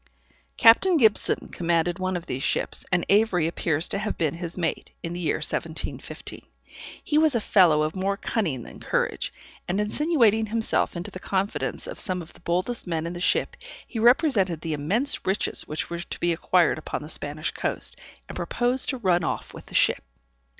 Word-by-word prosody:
Captain 325 +11 +6
Gibson 220 -7 +3
commanded 170 +1 0
one 185 0 -1
of 170 - -8
these 130 - -4
ships, - - -1
and 175 -1 +2
Avery 200 -5 +3
appears 165 -1 0
to 200 - -2
have 210 +1 -3
been 155 -4 0
his 170 0 -5
mate, 170 -3 -2
in 170 - -3
the 175 - -5
year 170 - 0
1715. - - -4 0.6
He 300 -1 +2
was 310 -4 +3
a - - +3
fellow 175 -8 +4
of 155 +3 -2
more 195 +1 -1
cunning 160 - -2
than - - -11
courage, - - -1 0.4
and 185 +3 0
insinuating 225 -2 +2
himself 225 -2 0
into 170 - -5
the 185 - -8
confidence 195 +2 -2
of - - -7
some 185 -4 0
of 160 - -15
the - - -16
boldest 185 +7 -1
men 165 -2 -2
in 170 - -4
the 175 - -6
ship, 440 - +1 0.3
he 230 - -6
represented 230 - +3
the 160 -1 -3
immense 200 - 0
riches 190 +2 0
which 155 +2 -4
were 170 - -3
to 175 - -6
be 175 0 +2
acquired 170 0 +2
upon 155 - -5
the - - -8
Spanish 155 0 -2
coast, - - -2 0.3
and - - -8
proposed 245 +2 +1
to 265 - -1
run 180 -6 +2
off - - -3
with - - -11
the - - -9
ship. - - +3
185 Hz, 190 wpm, -25 LUFS, 170-225 Hz, 0.6 s, Captain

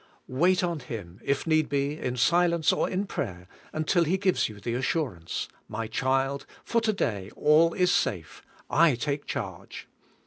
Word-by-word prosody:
Wait 180 +8 +2
on 170 -3 -1
Him, 100 -8 -8
if 140 0 0
need 155 -2 +2
be, 140 +1 0
in 125 0 -3
silence, 170 +4 +3
or - - 0
in 190 +2 -1
prayer, 90 - -5 0.2
until 155 +3 +2
He 170 +4 +1
gives 190 - +1
you 105 -1 -10
the 115 +3 -3
assurance, 125 - -2 0.2
"My 115 +1 -4
child, 135 +4 0 0.2
for 230 - +1
to 225 -1 +2
day 100 - -2
all 160 +3 +4
is 180 -1 +3
safe; 90 - -1 0.3
I 160 -3 +4
take 140 +4 -3
charge." 95 -5 -6
140 Hz, 165 wpm, -27 LUFS, 115-170 Hz, 0.3 s, all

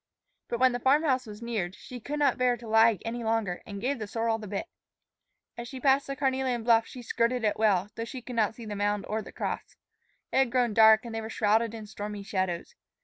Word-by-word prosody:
But 235 - -3
when 260 0 +5
the 245 - -2
farm 275 +5 +3
house 260 -5 +1
was 210 +2 -9
neared, 200 -6 -3
she 250 - -9
could 290 +6 -4
not 290 -3 +2
bear 250 -1 +2
to 235 0 -11
lag 225 -2 +4
any 235 +1 -3
longer, 220 -5 -1
and 200 -1 -6
gave 260 +4 -1
the 215 - -4
sorrel 225 +1 -1
the 215 - -8
bit. 200 - -3 0.9
As 235 - -5
she 260 +1 -7
passed 270 +2 +3
the 275 - -3
carnelian 260 -3 0
bluff, 230 -1 +4
she 250 - -9
skirted 235 +1 0
it 210 -1 0
well, 205 -2 +2
though 230 - -4
she 250 +1 -8
could 250 +1 -7
not 220 -1 +1
see 235 - -9
the 210 -1 -5
mound 205 0 0
or 220 +1 -2
the - - -11
cross. - - -4 0.6
It - - 0
had 265 -3 +3
grown 245 -3 +2
dark 220 +1 +6
and 235 - -6
they 225 - -3
were 220 - -6
shrouded 225 +1 +1
in 220 -1 -7
stormy 205 0 -6
shadows. 185 -3 -2
225 Hz, 240 wpm, -28 LUFS, 210-250 Hz, 0.9 s, dark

